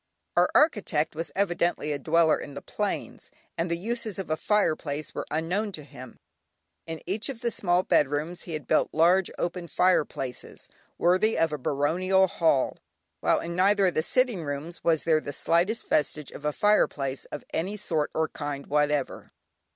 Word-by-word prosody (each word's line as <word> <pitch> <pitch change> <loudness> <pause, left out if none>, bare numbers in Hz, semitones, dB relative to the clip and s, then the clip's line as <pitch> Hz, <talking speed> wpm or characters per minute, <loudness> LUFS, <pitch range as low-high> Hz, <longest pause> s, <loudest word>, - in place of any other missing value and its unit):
Our - - +4
architect 195 - +2
was 165 +2 -4
evidently 175 -5 0
a 145 - -2
dweller 160 +2 +3
in 140 - -8
the - - -6
plains, - - -4 0.3
and 165 +1 -1
the 170 - 0
uses 220 +2 -4
of 190 -5 -5
a - - +3
fireplace 155 -5 0
were - - -5
unknown 180 +7 -1
to 155 - -7
him. 130 -3 -12 0.7
In 165 -1 -6
each 205 +8 -1
of 245 -4 -6
the 235 -1 0
small 180 -3 +2
bedrooms 155 +1 +1
he 170 - -6
had 155 -3 -4
built - - +2
large 175 +4 +4
open 175 0 -3
fireplaces, 145 -6 -1 0.3
worthy 185 +6 +3
of 165 -1 +2
a 150 - -3
baronial 180 +9 +2
hall, 165 -7 +1 0.4
while - - +2
in 170 0 -5
neither 195 +2 +4
of 180 - +2
the - - +2
sitting 240 -1 +1
rooms 145 +4 -5
was 160 -2 +2
there 160 -2 +3
the 145 - -6
slightest 175 - +1
vestige 150 -1 0
of 150 - -10
a 150 - +2
fireplace 145 -9 +1
of 150 - -7
any 190 +6 -2
sort 160 -7 -1
or 160 0 +1
kind 145 -2 -5
whatever. 150 -1 0
165 Hz, 175 wpm, -27 LUFS, 150-190 Hz, 0.7 s, Our